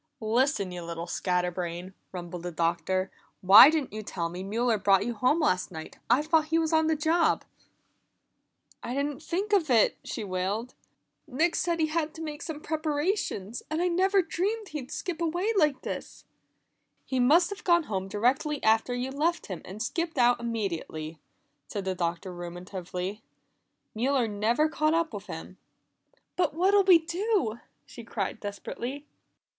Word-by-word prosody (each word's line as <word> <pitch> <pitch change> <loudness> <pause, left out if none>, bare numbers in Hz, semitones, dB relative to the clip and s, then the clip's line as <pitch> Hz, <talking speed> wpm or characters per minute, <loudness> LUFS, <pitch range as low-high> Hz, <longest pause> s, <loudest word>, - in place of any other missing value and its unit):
"Listen, 225 -3 +1
you 180 -1 -6
little 170 0 -5
scatter 180 0 0
brain!" 175 +1 -5 0.2
rumbled 175 -1 -6
the 175 +1 -5
Doctor. 170 +3 0 0.3
"Why 195 +8 +10
didn't 305 -8 -1
you 215 - -4
tell 170 -5 -3
me 175 +2 -6
Mueller 220 +3 0
brought 195 -1 +4
you 240 - -2
home 255 +8 +2
last 185 - +1
night? 160 -2 -9
I 250 +5 +4
thought 315 0 +3
he 320 +1 +1
was 325 0 0
on 320 0 +4
the 320 - +2
job." 320 +3 +2 1.4
"I 245 - -4
didn't 285 +1 -2
think 390 +6 -2
of 350 -7 +3
it," 230 -4 +4
she 225 - -5
wailed. 200 +5 -2 0.5
"Nick 310 +5 +1
said 340 -2 0
he'd 315 -1 +2
have 310 -1 -1
to 325 - -9
make 300 -2 -6
some 310 -3 -6
preparations, 300 - -2
and 310 +1 -1
I 360 +1 +2
never 380 +2 +3
dreamed 395 +6 -2
he'd 280 -4 -6
skip 335 +3 -4
away 350 +7 0
like 300 -7 +2
this." - - -6 0.8
"He 260 - -1
must 320 +10 +4
have 405 +2 -7
gone 345 -2 +4
home 190 -7 -3
directly 255 +9 0
after 225 +3 +3
you 250 +2 -3
left 320 +5 0
him, 185 -5 -6
and 205 +4 -6
skipped 330 +5 -3
out 245 -1 +4
immediately," 170 -9 -4 0.5
said 200 -2 -5
the 190 - 0
Doctor 175 +1 -3
ruminatively. 180 +3 -6 0.7
"Mueller 250 +2 +1
never 220 +8 +1
caught 310 0 +1
up 330 -5 0
with 205 0 -7
him." 180 +1 -8 0.8
"But 350 -5 +1
what'll 390 +3 +4
we 370 -3 +8
do?" 335 - -1 0.3
she 235 - -11
cried 220 -2 -3
desperately. 240 +7 -6
245 Hz, 165 wpm, -28 LUFS, 190-320 Hz, 1.4 s, Why